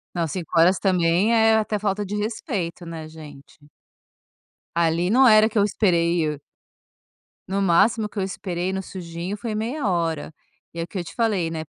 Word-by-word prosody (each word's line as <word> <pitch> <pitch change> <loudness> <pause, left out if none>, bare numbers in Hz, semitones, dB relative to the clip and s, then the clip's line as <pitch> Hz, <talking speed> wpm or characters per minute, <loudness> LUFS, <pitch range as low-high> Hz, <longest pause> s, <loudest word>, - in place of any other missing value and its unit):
Não, 165 -2 -1
5 170 -1 -5
horas 180 +2 +5
também, 185 +3 +2
é 225 0 +5
é - - +5
até 215 -1 0
falta 205 0 -2
de 205 - -5
respeito, 205 - -4
né, 160 -2 -7
gente? 150 -3 -13 1.2
Ali 170 +1 +1
não 260 +5 +5
era 215 0 +6
que 220 - -12
eu 205 - +5
esperei, 170 -5 +1
e 155 - 0
o 150 -1 -6 1.1
no 195 +1 -1
máximo 205 +4 +3
que 210 - -9
eu - - 0
esperei, 185 -1 -3
no 190 0 -3
sujinho, 175 +1 -6
foi 220 0 -5
meia 235 +4 -2
hora, 165 -4 -1 0.4
e 170 - -6
é - - -1
o - - -4
que 190 - -6
eu 175 - -3
te - - -11
falei, 205 -8 0
né 160 -1 -4
185 Hz, 195 wpm, -23 LUFS, 170-210 Hz, 1.2 s, era